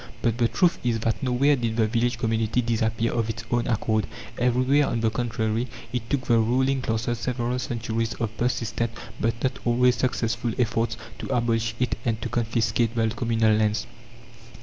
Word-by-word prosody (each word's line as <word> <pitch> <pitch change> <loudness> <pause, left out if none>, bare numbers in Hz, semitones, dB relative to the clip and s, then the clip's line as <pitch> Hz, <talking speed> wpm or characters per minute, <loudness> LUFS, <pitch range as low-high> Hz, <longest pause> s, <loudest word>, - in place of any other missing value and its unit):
But 115 +1 +1
the 120 - +4
truth 175 +8 +2
is 120 -2 +1
that 115 +4 0
nowhere 135 +2 +3
did 115 -3 -2
the 110 - +4
village 120 +2 0
community 115 0 0
disappear 115 0 0
of 115 -2 0
its 115 +1 -4
own 120 -1 +1
accord; 110 -2 +1 0.3
everywhere, 130 +4 +3
on 115 -1 -1
the 110 -1 +2
contrary, 115 0 -1 0.3
it 120 -2 -3
took 140 -2 +1
the 120 -2 +4
ruling 130 +4 +2
classes 115 0 -1
several 125 +1 -1
centuries 115 -2 -2
of 115 -1 -3
persistent 115 -1 -1 0.3
but 115 +1 +1
not 130 0 0
always 125 +1 +3
successful 120 -1 -1
efforts 115 -1 0 0.2
to - - -5
abolish 115 -2 0
it 125 -2 0
and 115 -2 0
to - - -3
confiscate 115 0 0
the 115 -1 +2
communal 115 -1 +2
lands. 105 0 +1
115 Hz, 170 wpm, -25 LUFS, 110-125 Hz, 0.3 s, the